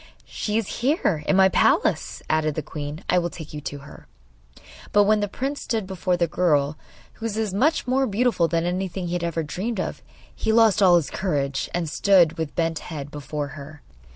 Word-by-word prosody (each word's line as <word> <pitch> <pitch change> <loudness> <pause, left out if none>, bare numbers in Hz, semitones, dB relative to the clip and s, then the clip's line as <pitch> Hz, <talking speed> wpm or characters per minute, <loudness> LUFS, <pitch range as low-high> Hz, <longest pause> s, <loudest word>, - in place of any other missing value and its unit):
'She 210 0 -2
is 225 -3 -3
here, 240 - +1
in - - +3
my 190 0 +6
palace,' 190 - +1
added 155 -1 +1
the 155 - -3
queen. 150 +3 -6
'I 180 - +3
will 175 0 -2
take 160 -3 -10
you 150 - -6
to 145 - -5
her.' - - -14 0.8
But 205 - +5
when 215 +1 +3
the 205 - 0
prince 270 +8 -4
stood 225 -4 -2
before 185 -1 -1
the 175 - +2
girl, 150 -3 +1 0.4
who 225 - -8
was 215 - -4 0.2
so - - -5
much 300 +10 +2
more 265 +1 +1
beautiful 215 -4 +2
than 165 +1 0
anything 185 +1 -2
he - - -3
had 175 -1 -2
ever 165 -1 -1
dreamed 195 +8 -3
of, - - -4 0.3
he 220 - -1
lost 220 -2 +4
all 180 -3 +7
his 165 -5 +1
courage, 140 -7 -1
and 175 -2 -2
stood 170 0 +3
with 160 -2 -3
bent 165 -2 0
head 145 -3 -7
before 145 0 -4
her. 145 +1 -11
175 Hz, 205 wpm, -24 LUFS, 155-205 Hz, 0.8 s, all